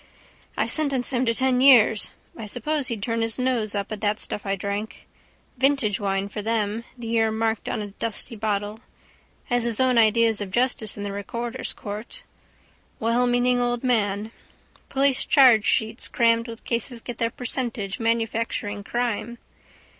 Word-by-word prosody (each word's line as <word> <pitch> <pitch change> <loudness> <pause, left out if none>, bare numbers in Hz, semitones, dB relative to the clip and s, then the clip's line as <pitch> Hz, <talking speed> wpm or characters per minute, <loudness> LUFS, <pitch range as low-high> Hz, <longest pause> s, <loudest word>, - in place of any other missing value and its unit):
I - - +2
sentenced 280 -4 +1
him 250 0 +1
to 230 - +3
ten 260 0 +2
years. 235 -6 +6 0.3
I 220 - -7
suppose 275 +5 -1
he'd 220 -4 -4
turn 230 0 -1
up - - 0
his 225 -1 -1
nose 245 -5 0
at 200 -1 -2
that 210 0 +1
stuff 205 - -4
I 195 - +1
drank. 200 +3 -5 0.5
Vintage 265 -7 +2
wine 195 -1 -1
for 210 +1 -6
them, 220 +1 -1
the 240 - -8
year 225 -1 +2
marked 220 0 -1
on 215 - -2
a 205 - -7
dusty 230 +2 -4
bottle. 210 0 -2 0.7
Has 245 -1 +1
his 235 -2 +2
own 255 -2 +4
ideas 225 -1 +3
of 200 - -4
justice 235 -1 0
in 205 - -5
the 205 - -3
recorder's 235 +5 -4
court. 215 - -8 0.8
Wellmeaning 245 +2 +2
old 245 0 -1
man. 215 -3 0 0.6
Police 275 -1 +2
chargesheets 225 -3 +4
crammed 230 0 +2
with 230 -1 -9
cases 235 0 -2
get 240 -1 -7
their 230 -1 +1
percentage 240 -5 -3
manufacturing 225 -2 -1
crime. 235 0 -2
230 Hz, 155 wpm, -24 LUFS, 210-245 Hz, 0.8 s, years